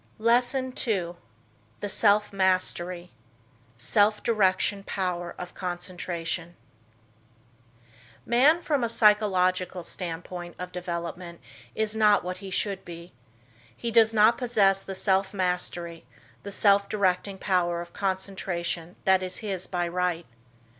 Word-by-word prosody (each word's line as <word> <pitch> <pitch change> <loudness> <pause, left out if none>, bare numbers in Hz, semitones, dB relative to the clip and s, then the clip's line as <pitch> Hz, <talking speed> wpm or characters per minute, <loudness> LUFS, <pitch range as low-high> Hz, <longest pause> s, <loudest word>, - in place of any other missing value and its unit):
LESSON 245 +3 +2
II. 180 -6 0 0.7
THE 205 - -3
SELF 210 0 +2
MASTERY: 185 -2 0 0.7
SELF 205 - +2
DIRECTION 200 -2 +2
POWER 180 -3 -3
OF 180 0 -7
CONCENTRATION 175 -1 -4 1.7
Man 280 +8 +4
from 290 -6 0
a 235 - 0
psychological 190 -5 +2
standpoint 175 0 -5
of 180 0 -6
development 170 -1 -5 0.4
is 220 0 -1
not 210 -2 +4
what 180 +1 -5
he 195 0 -8
should 195 +1 -1
be. 170 -2 -10 0.6
He 235 - -3
does 225 -1 +5
not 220 +1 +4
possess 205 -6 +3
the 195 0 -7
self 190 +1 +1
mastery, 175 -4 -3 0.3
the 200 - -7
self 200 0 +3
directing 195 -1 0
power 180 -3 0
of 170 0 -8
concentration 185 -3 -3
that 190 -1 +4
is 185 0 -4
his 190 -3 -3
by 175 -2 -1
right. 175 -1 -1
185 Hz, 120 wpm, -27 LUFS, 175-210 Hz, 1.7 s, does